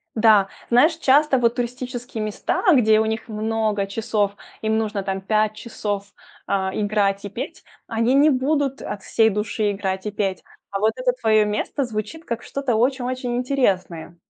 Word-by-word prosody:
Да, 215 -3 +5 0.2
знаешь, 305 +7 +4
часто 280 -2 +4
вот 235 -1 +2
туристические 245 -2 -4
места, 215 -1 -2
где 220 -4 +5
у 220 - +2
них 220 0 -3
много 215 -2 -1
часов, 205 -1 -1 0.3
им 220 0 +1
нужно 215 -2 -1
там 195 0 -3
5 215 +1 +1
часов, 205 -3 -4 0.4
а, 190 -1 0
играть 205 -1 0
и 205 - -4
петь, 265 - -7 0.2
они 230 +2 +1
не 285 +3 +6
будут 275 0 0
от 205 - -5
всей 220 +2 +3
души 210 0 -1
играть 190 -1 -3
и 210 - -2
петь. 195 -3 -2 0.3
А 195 - -3
вот 220 +1 +2
это - - +1
твоё 215 -1 +4
место 210 +7 -1
звучит 235 +8 -5
как 235 0 -4
что-то 275 -4 -2
очень-очень 250 +1 0
интересное. 195 - -1
220 Hz, 165 wpm, -22 LUFS, 205-250 Hz, 0.4 s, не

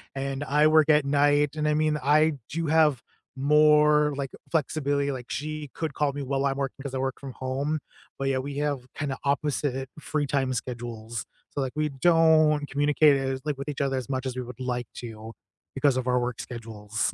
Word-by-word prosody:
and 135 +1 -3
I 150 +1 +4
work 155 0 +4
at 150 -2 +5
night. 145 +1 +3
And 150 -1 -1
I 150 - +3
mean, 155 0 +1
I 155 +3 +4 0.2
do 165 +1 -2
have 150 -5 +3 0.3
more, 150 +1 +4
like, 140 -1 -4 0.2
flexibility, 145 -2 0
like 125 -3 -6
she 155 0 -4
could 160 -3 -3
call 145 -1 0
me 145 - -4
while 135 0 -1
I'm 135 0 0
working 135 0 -4
'cause 140 -2 -5
I - - -1
work 130 0 -2
from 135 -2 -8
home. 135 +5 -2 0.4
But 135 - -2
yeah, 130 -1 +1
we 140 +1 -5
have 145 -2 0
kinda 140 -3 -3
opposite 140 -2 -1
free 150 -1 -1
time 135 -2 0
schedules. 115 -2 -5 0.3
So 145 - -2
like, 130 -1 -2
we 155 0 0
don't 155 0 +4
communicate 145 +1 +4
as 135 -1 -2
like 150 -3 -2
with 140 +2 -6
each 145 -1 -3
other 135 -1 0
as 125 -3 -5
much 130 -1 -2
as 130 -1 -3
we - - -1
would 125 0 -9
like 125 -2 -3
to, 115 -2 -8 0.4
because 135 -1 +2
of 130 -1 -2
our 125 0 +3
work 125 -1 -3
schedules. 110 -2 -4
140 Hz, 205 wpm, -26 LUFS, 130-150 Hz, 0.4 s, at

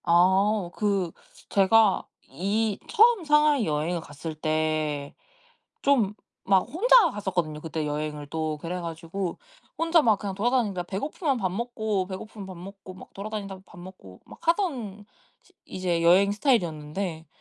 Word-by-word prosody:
아오 190 +2 +3
그 195 -4 0 0.4
제가 200 +1 +4 0.3
이 205 +3 -1
처음 460 -3 +5
상하이 300 -4 +4
여행을 160 +3 -1
갔을 155 +1 -7
때 155 -2 -1 0.7
좀 235 -8 +3 0.4
막 190 -1 +6
혼자 420 - +4
갔었거든요, 175 - -2
그때 160 -1 -4
여행을 150 0 -3
또. 155 -1 -2
그래가지고 170 +2 -5 0.4
혼자 330 0 +4
막 220 -8 +3
그냥 200 -2 -4
돌아다니니까 215 -3 0
배고프면 275 - -2
밥 190 -6 -1
먹고, 220 -3 -2
배고프면 195 +2 -8
밥 185 -1 -9
먹고, 190 +1 -10
막 185 - -14
돌아다니다가 200 -2 -6
밥 205 - -15
먹고, 175 - -12
막 - - -14
하던 255 - 0 0.4
시 375 - -26
이제 180 -2 -1
여행 190 +4 +5
스타일이었는데 170 - -1
190 Hz, 300 characters per minute, -26 LUFS, 165-220 Hz, 0.7 s, 막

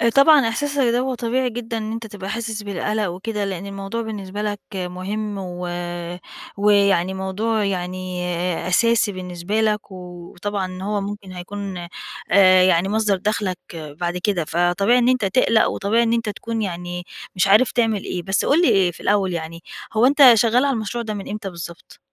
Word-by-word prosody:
طبعًا 280 -2 +7
إحساسك 285 +5 -1
ده 240 -1 +2
هو 260 +1 -1
طبيعي 250 +2 0
جدًا، 230 0 -5
إن 215 0 -4
أنتَ 225 0 -5
تبقى 200 -2 -7
حاسس 220 -1 -4
بالقلق 205 +2 -2
وكده، 205 +4 -3
لأن 195 -1 -4
الموضوع 195 +3 -4
بالنسبة 205 -3 -5
لك 205 -1 -2 0.2
مهم، 190 +4 -4
و 180 -2 -5 0.9
ويعني 200 -3 +3
موضوع 205 +4 -1
يعني 185 -1 -3 0.4
أساسي 230 +3 +3
بالنسبة 185 +2 -3
لَك، 210 -1 0
وطبعًا 185 +1 -6
هو 205 0 -1
ممكن 200 -1 -6
هيكون، 185 0 -6 0.4
آآ 185 -1 +7
يعني 185 0 +3
مصدر 210 -1 +2
دخلك 190 -1 -1 0.2
بعد 165 +2 -4
كده، 180 -3 0
فطبيعي 175 +8 +2
إن 245 0 +3
أنتَ 255 -4 +2
تقلق، 230 +1 +3
وطبيعي 220 +4 +1
إن 230 0 +1
أنتَ 230 -2 0
تكون 225 +2 -4
يعني 175 -2 -4 0.3
مش 185 +1 +2
عارف 215 +5 +5
تعمل 225 -4 +1
إيه. 180 - -4
بس 190 +1 0
قُل 305 +5 +4
لي، 195 - +4
آآ - - -1
في 170 - -15
الأول 195 -3 +1
يعني، 165 0 -6 0.3
هو 220 +2 +4
أنتَ 275 -1 +8
شغال 230 +4 +3
على 280 - +2
المشروع 235 +1 -3
ده 215 -1 -4
من 200 -2 -6
إمتى 210 -1 -4
بالضبط؟ 170 -1 -10
200 Hz, 170 wpm, -21 LUFS, 185-225 Hz, 0.9 s, أنتَ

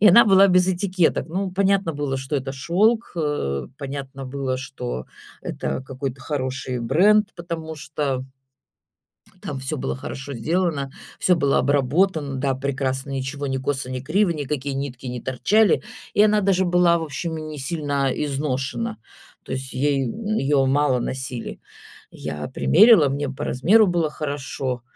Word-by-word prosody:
и 210 - +8
она 220 +7 +8
была 195 -1 +6
без 180 0 +4
этикеток. 185 -3 +1
Ну, 190 +2 -2
понятно 195 -2 +2
было, 145 -2 -2
что 135 +2 -4
это 135 0 -3
шёлк, 205 - +1
э, 145 - -1
понятно 135 -1 -6
было, 130 -1 -2
что 65 - -5 0.4
это 130 - -3
какой-то 135 0 -5
хороший 130 -3 -3
бренд, 200 - +4
потому 165 -2 -5
что 140 -2 -3 1.2
там 140 -2 -5
всё 135 +4 -3
было 65 - -3
хорошо 135 - -6
сделано, 150 +1 -1 0.3
всё 180 -2 +3
было 140 -3 +2
обработано, 145 +2 +1
да, 135 0 0
прекрасно, 135 0 -2
ничего 135 +1 -3
ни 135 - -1
косо, 130 -1 -2
ни 130 -1 -3
криво, 180 +8 +2
никакие 145 -3 -3
нитки 135 -2 -5
не 125 -1 -4
торчали, 200 - +2 0.3
и 205 - +5
она 210 0 +4
даже 190 -1 +2
была, 175 -1 +4
в 165 - -3
общем, 160 +2 -4
и - - -5
несильно 145 -2 -2
изношена, 145 - -2 0.5
то - - -7
есть 130 0 -4
ей, 140 0 +1
м, 215 - -3
её 135 -1 +2
мало 135 -1 +2
носили. 130 -1 -4 0.5
Я 75 0 -6
примерила, 170 - +6
мне 140 +1 -2
по 135 - -5
размеру 200 - +4
было 170 -3 +1
хорошо. 135 -4 -4
145 Hz, 150 wpm, -23 LUFS, 130-175 Hz, 1.2 s, и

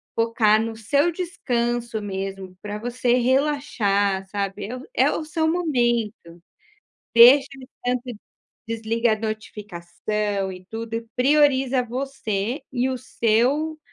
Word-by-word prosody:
focar 230 -2 +3
no 225 0 -3
seu 280 +9 +1
descanso 240 -10 -2
mesmo, 195 -2 -5
para 210 0 -5
você 245 +2 0
relaxar, 240 -7 +1
sabe, 200 -1 -3
é 240 - -5
o 255 - -10
é - - +3
o 315 - -3
seu 315 +1 0
momento. 240 - -1 0.7
Deixa 255 +4 +8
o 260 - -12 0.2
tanto 245 0 0 0.6
desliga 230 0 0
a 215 - -4
notificação 205 -1 -3
e 185 0 -11
tudo, 225 0 -6
e 230 0 -5
prioriza 270 -1 +3
você 245 -2 -3
e 255 0 0
o 260 - -2
seu, 255 +7 +1
235 Hz, 125 wpm, -23 LUFS, 210-260 Hz, 0.7 s, Deixa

